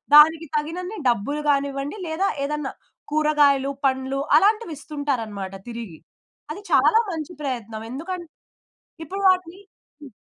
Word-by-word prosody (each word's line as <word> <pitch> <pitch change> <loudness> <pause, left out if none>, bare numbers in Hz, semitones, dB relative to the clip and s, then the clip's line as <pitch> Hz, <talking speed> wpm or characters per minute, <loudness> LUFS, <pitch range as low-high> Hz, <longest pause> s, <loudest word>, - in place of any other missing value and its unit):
దానికి 320 +2 +7
తగినన్ని 360 +7 -4
డబ్బులు 245 +6 -1
గానివ్వండి, 280 +3 0
లేదా 365 +5 0 0.2
ఏదైనా 300 -1 -3 0.4
కూరగాయలు, 290 -3 +3
పండ్లు 265 +1 0 0.2
అలాంటివి 425 -4 +2
ఇస్తుంటారన్నమాట 230 -11 -3
తిరిగి. 230 -9 -7 0.5
అది 390 - -6
చాలా 450 - +5
మంచి 320 0 -5
ప్రయత్నం. 230 -6 -4
ఎందుకన్ 345 +7 -5 0.8
ఇప్పుడు 390 +6 -5
వాటిని 365 -1 +1 0.4
హ్మ్. 285 - -10
295 Hz, 110 wpm, -23 LUFS, 265-335 Hz, 0.8 s, దానికి